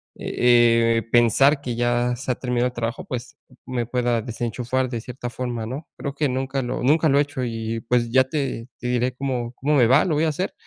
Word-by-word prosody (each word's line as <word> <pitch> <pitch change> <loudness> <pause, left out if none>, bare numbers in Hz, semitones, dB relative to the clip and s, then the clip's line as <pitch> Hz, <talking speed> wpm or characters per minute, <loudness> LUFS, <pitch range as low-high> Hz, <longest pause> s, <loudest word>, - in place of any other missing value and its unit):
eh 115 -1 +3
eh, 115 - 0
pensar 135 +5 +4
que 125 -4 -4
ya 120 +1 +1
se 130 +1 -3
ha - - -1
terminado 125 -1 0
el 125 - -6
trabajo, 115 +1 -4
pues, 125 -1 -6 0.3
me 125 -2 -2
pueda 120 -1 0
desenchufar 120 +3 -2
de 120 -2 -3
cierta 125 +1 -6
forma, 120 -2 -4
¿no?, 135 +7 -6
creo 140 - -4
que 150 +1 +1
nunca 135 +1 -2
lo 120 - -3
nunca 155 +5 +4
lo 140 - +3
he - - +6
hecho 140 -3 -5
y 115 -1 -3
pues, 120 -1 +2
ya 130 +1 +5
te 130 -4 -3
te 125 - -4
diré 125 +1 0
cómo 125 -3 -3
cómo 150 +4 0
me 125 -5 +5
va, 135 +5 +5
lo 165 -5 0
voy 155 +2 +2
a - - +2
hacer. 170 +5 -3
125 Hz, 225 wpm, -23 LUFS, 120-135 Hz, 0.3 s, he